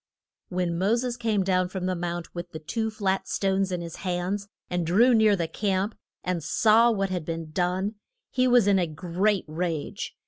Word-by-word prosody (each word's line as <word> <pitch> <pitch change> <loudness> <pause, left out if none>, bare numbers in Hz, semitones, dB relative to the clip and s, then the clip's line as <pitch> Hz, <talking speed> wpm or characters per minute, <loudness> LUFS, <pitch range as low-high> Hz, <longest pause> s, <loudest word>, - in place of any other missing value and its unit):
When 180 -2 -1
Mo 200 +5 +3
ses 245 0 -2
came 220 -5 0
down 185 -1 +1
from 185 -1 -4
the 185 - 0
mount 175 0 -4
with 175 0 -7
the - - -4
two 220 +8 -2
flat 195 -3 -1
stones 195 -1 0
in 180 -1 -2
his 170 -1 -7
hands, 185 +2 -2 0.2
and 180 -1 -1
drew 215 +10 +4
near 220 -2 +5
the 170 -3 -1
camp, 195 +4 -1 0.3
and 180 -3 -2
saw 225 +6 +5
what 195 -4 0
had 180 -3 -2
been 165 0 -5
done, 180 +5 0 0.4
he 255 0 +2
was 245 -4 +5
in 200 -1 +4
a 175 - +1
great 180 +6 0
rage. 160 -1 -3
185 Hz, 195 wpm, -26 LUFS, 175-210 Hz, 0.4 s, near